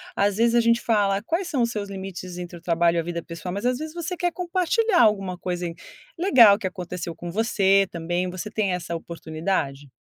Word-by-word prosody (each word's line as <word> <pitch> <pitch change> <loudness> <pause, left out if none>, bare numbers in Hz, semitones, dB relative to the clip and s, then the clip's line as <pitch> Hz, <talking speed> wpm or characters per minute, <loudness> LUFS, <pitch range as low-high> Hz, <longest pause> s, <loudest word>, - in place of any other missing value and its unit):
às 200 0 +1
vezes, 230 +1 +3
a - - +6
gente 230 0 +3
fala: 205 -3 +2
"Quais 335 - -1
são 280 -8 0
os 235 - 0
seus 205 -2 -4
limites 190 -2 -7
entre 175 -1 -7
o - - -15
trabalho 170 0 +2
e - - +3
a 165 - -1
vida 170 0 -4
pessoal?", 170 +2 -7
mas 200 +4 -4
às 250 +1 +1
vezes, 310 0 -6
você 345 +1 -3
quer 355 0 0
compartilhar 370 +4 +1
alguma 195 -4 +2
coisa 180 0 -3 0.5
legal 240 - +6
que 190 - -2
aconteceu 180 -2 -6
com 175 -1 -7
você 195 -2 +3
também, 175 +2 -2
você 185 +3 -6
tem 200 -4 0
essa 170 -1 -4
oportunidade? 160 -4 -3
195 Hz, 210 wpm, -24 LUFS, 175-235 Hz, 0.5 s, a